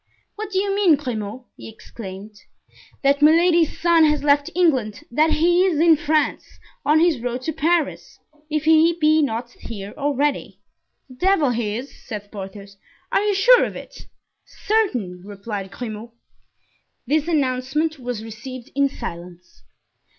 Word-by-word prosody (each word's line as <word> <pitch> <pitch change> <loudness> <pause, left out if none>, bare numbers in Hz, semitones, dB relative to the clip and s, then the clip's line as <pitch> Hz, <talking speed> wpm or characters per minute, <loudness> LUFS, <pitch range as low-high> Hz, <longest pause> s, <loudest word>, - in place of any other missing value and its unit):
"What 430 0 -6
do 385 - -3
you 395 +1 0
mean, 385 -6 +4
Grimaud?" 245 -4 -5
he - - -10
exclaimed. 210 -2 -10 0.7
"That 280 +1 +3
Milady's 330 +1 +4
son 335 -1 +4
has 300 -1 +1
left 285 0 +3
England, 260 - +1
that 310 +6 +3
he 345 +3 +3
is 360 -6 +1
in 330 0 +6
France, 305 -1 0 0.4
on 300 +2 +3
his 330 -5 +2
road 245 +1 -4
to 320 - -3
Paris, 320 0 -1 0.3
if 305 -1 -1
he 320 +1 +4
be 310 0 +4
not 240 -3 -2
here 205 -4 -9
already." 290 0 -1 0.5
"The 255 -2 -15
devil 355 -5 +2
he 225 -3 -2
is!" 265 +4 -8
said 210 -3 -8
Porthos. 200 0 -9 0.3
"Are - - +2
you 415 -1 0
sure 485 +6 +6
of - - -4
it?" - - -11 0.4
"Certain," 250 - -2
replied 200 0 -6
Grimaud. 220 +1 -7 1.0
This 300 +4 0
announcement 290 +1 -1
was 245 -3 -5
received 240 +4 -9
in 280 0 +2
silence. 175 -5 -9
280 Hz, 145 wpm, -21 LUFS, 225-320 Hz, 1.0 s, in